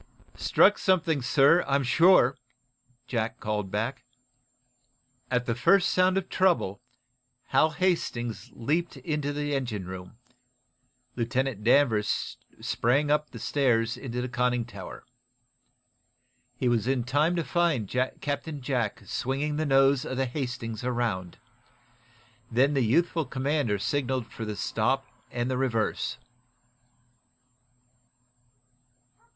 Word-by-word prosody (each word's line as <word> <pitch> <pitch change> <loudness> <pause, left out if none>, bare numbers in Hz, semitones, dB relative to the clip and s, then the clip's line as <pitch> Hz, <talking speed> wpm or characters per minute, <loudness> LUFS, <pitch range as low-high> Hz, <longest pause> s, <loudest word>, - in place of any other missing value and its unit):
"Struck 205 - +4
something, 170 -6 +2
sir, 140 +7 +4
I'm 140 0 +2
sure," 140 -1 +5 0.7
Jack 120 0 -2
called 105 -2 -2
back. 115 +6 -3 1.3
At 125 -1 0
the 115 - 0
first 180 +11 +4
sound 185 +1 +3
of 190 -1 -1
trouble, 175 - +1 0.7
Hal 155 - +4
Hastings 150 - -1
leaped 160 +9 -1
into 150 -3 -2
the 145 0 -2
engine 120 -8 -2
room. 90 +4 -9 1.0
Lieutenant 125 -1 -1
Danvers 115 -3 +2 0.2
sprang 140 +5 +1
up 150 0 +1
the - - -10
stairs 120 -5 +1
into 125 -2 -5
the - - -2
conning 125 -1 0
tower. 120 - -10 1.5
He 130 - 0
was 120 -1 +1
in 130 -2 +1
time 145 +7 +1
to 170 - 0
find 165 - +1 0.3
Captain 145 +1 -3
Jack 120 -4 -2
swinging 140 +8 -2
the 155 0 -1
nose 135 -1 +4
of 130 - -4
the 135 - +1
"Hastings" 125 -4 -4
around. 115 -8 -2 1.1
Then 130 +5 +3
the 135 - +2
youthful 165 +7 +2
commander 130 -4 0
signaled 130 +2 -1
for 115 - -6
the 105 -1 -4
stop - - 0 0.2
and 120 0 -2
the 130 -1 -1
reverse. 115 -4 -1
130 Hz, 115 wpm, -27 LUFS, 120-150 Hz, 1.5 s, sure